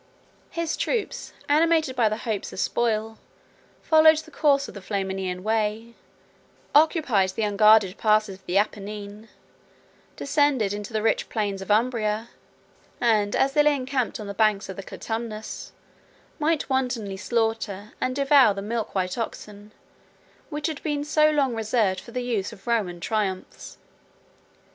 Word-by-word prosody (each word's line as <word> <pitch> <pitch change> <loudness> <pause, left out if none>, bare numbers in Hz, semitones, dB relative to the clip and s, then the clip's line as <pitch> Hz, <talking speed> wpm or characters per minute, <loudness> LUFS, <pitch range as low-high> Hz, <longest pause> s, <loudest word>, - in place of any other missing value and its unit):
His 335 -1 -2
troops, 455 -4 -2 0.2
animated 315 -2 +3
by 230 -4 +3
the 215 - -2
hopes 215 -4 -3
of - - -8
spoil, 220 -1 -1 0.6
followed 315 0 +6
the 315 - -7
course 280 -2 +2
of - - -10
the 200 - -9
Flaminian 190 -2 -3
way, 220 +1 -1 0.8
occupied 290 - +3
the 225 - -1
unguarded 210 -1 +4
passes 215 -3 +2
of 190 - -31
the 180 - +1
Apennine, 205 +1 -3
4 - - -26 0.9
descended 280 -8 +1
into 205 +2 -6
the 215 -1 -1
rich 225 - +1
plains 200 -3 -2
of 190 - -9
Umbria; 220 0 +1 0.7
and, 215 -4 +2
as 270 0 +2
they 295 - +5
lay 295 0 +4
encamped 255 -3 -2
on 210 - -6
the 200 - -5
banks 210 -1 +1
of 190 - -5
the 195 - -6
Clitumnus, 220 +2 -6 0.7
might 310 0 +1
wantonly 250 -7 -1
slaughter 220 -2 -2
and 255 - -1
devour 275 -6 +5
the 195 - -5
milk 225 0 -3
white 185 +3 -1
oxen, 210 -2 -7 0.8
which 295 -2 -4
had 315 -3 -3
been 295 -2 -2
so 305 +1 +3
long 280 -4 +1
reserved 220 -4 0
for 235 - -13
the 250 +1 -4
use 220 -6 -2
of 195 - -14
Roman 210 -8 -1
triumphs. 195 -2 -3
220 Hz, 150 wpm, -25 LUFS, 205-265 Hz, 0.9 s, followed